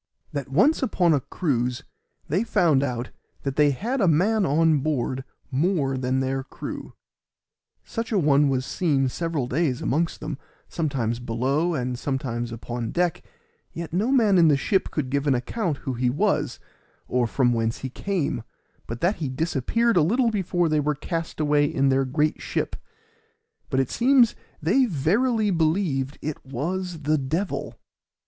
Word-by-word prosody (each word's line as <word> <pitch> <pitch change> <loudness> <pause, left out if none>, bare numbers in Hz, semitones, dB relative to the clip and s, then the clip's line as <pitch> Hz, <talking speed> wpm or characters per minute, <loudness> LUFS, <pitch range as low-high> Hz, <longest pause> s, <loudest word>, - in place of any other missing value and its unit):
That 140 -3 -4
once 205 - +3
upon 180 -9 +2
a 145 - +3
cruise 125 -4 -1 0.4
they 185 +9 +1
found 165 - +3
out 125 -3 -3 0.3
that 135 -1 -2
they 150 0 +5
had 230 - -1
a 195 - +4
man 190 +6 +3
on 155 +1 +3
board 135 -3 -1 0.3
more 140 -1 +1
than 130 0 0
their 135 0 -1
crew; - - -7 0.9
such 230 0 -4
a 215 - +2
one 145 -4 +4
was 130 -1 0
seen 140 -6 +1
several 165 -2 -2
days 135 -1 0
amongst 165 +4 0
them, 150 -2 -5 0.3
sometimes 125 -8 -1
below 135 +8 0
and 125 -2 -2
sometimes 120 -4 -2
upon 115 0 -4
deck, 175 +3 0 0.5
yet 165 -1 -6
no 210 +8 +1
man 215 -8 +4
in 165 - +6
the 145 -2 +4
ship 190 +7 +1
could 135 -4 -3
give 140 +1 0
an 135 - +4
account 155 - -2
who 130 - -1
he 125 +1 +1
was, 150 -2 0 0.5
or 125 -1 +1
from 120 +1 +2
whence 115 0 0
he 130 - -4
came, 160 -8 -2 0.5
but 115 +1 -6
that 185 +5 +2
he 150 -5 -3
disappeared 165 - +1
a - - +6
little 230 +9 +2
before 180 -4 0
they 155 -1 +2
were 150 0 0
cast 165 +3 -4
away 145 -1 +3
in 140 -2 +1
their 135 0 +2
great 150 +4 0
ship; - - -2 0.9
but 130 - +1
it 135 - 0
seems 245 -2 +4 0.3
they 230 - +4
verily 210 - +1
believed 160 -5 0
it 155 0 -4
was 165 +5 -4
the 155 +1 +2
devil. 160 +9 -2
150 Hz, 165 wpm, -25 LUFS, 130-180 Hz, 0.9 s, in